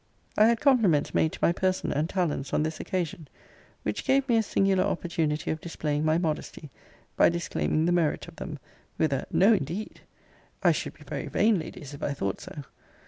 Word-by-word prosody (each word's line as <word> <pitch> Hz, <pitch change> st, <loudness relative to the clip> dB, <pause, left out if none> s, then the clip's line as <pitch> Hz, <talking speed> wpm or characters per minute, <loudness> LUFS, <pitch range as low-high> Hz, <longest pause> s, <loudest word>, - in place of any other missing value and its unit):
I 215 Hz, -, +6 dB
had 230 Hz, -1 st, +3 dB
compliments 215 Hz, -, +3 dB
made 160 Hz, -, +2 dB
to -, -, -8 dB
my -, -, +5 dB
person 185 Hz, +1 st, 0 dB
and 155 Hz, +3 st, 0 dB
talents 170 Hz, -7 st, -1 dB
on -, -, +2 dB
this 155 Hz, 0 st, -3 dB
occasion: 175 Hz, -3 st, -3 dB, 0.6 s
which -, -, -2 dB
gave 270 Hz, -1 st, +2 dB
me 240 Hz, -, +3 dB
a 225 Hz, -, +4 dB
singular 195 Hz, -3 st, +2 dB
opportunity 165 Hz, -3 st, -1 dB
of 155 Hz, 0 st, -4 dB
displaying 150 Hz, -3 st, -2 dB
my 155 Hz, +1 st, +3 dB
modesty, 155 Hz, -3 st, -3 dB, 0.4 s
by -, -, +5 dB
disclaiming 170 Hz, -2 st, 0 dB
the 175 Hz, -, +2 dB
merit 170 Hz, -3 st, +1 dB
of 170 Hz, -, -13 dB
them, 155 Hz, -5 st, -6 dB, 0.4 s
with 155 Hz, -3 st, +2 dB
a 135 Hz, -, -2 dB
No, 205 Hz, +5 st, +5 dB
indeed! 185 Hz, +3 st, -3 dB, 0.6 s
I -, -, +6 dB
should -, -, -3 dB
be -, -, -16 dB
very -, -, -5 dB
vain, 215 Hz, -3 st, +3 dB
Ladies, 145 Hz, -3 st, -8 dB
if 140 Hz, -, -10 dB
I 145 Hz, -, -1 dB
thought 100 Hz, -6 st, -3 dB
so. 145 Hz, -, -8 dB
170 Hz, 195 wpm, -27 LUFS, 150-195 Hz, 0.6 s, I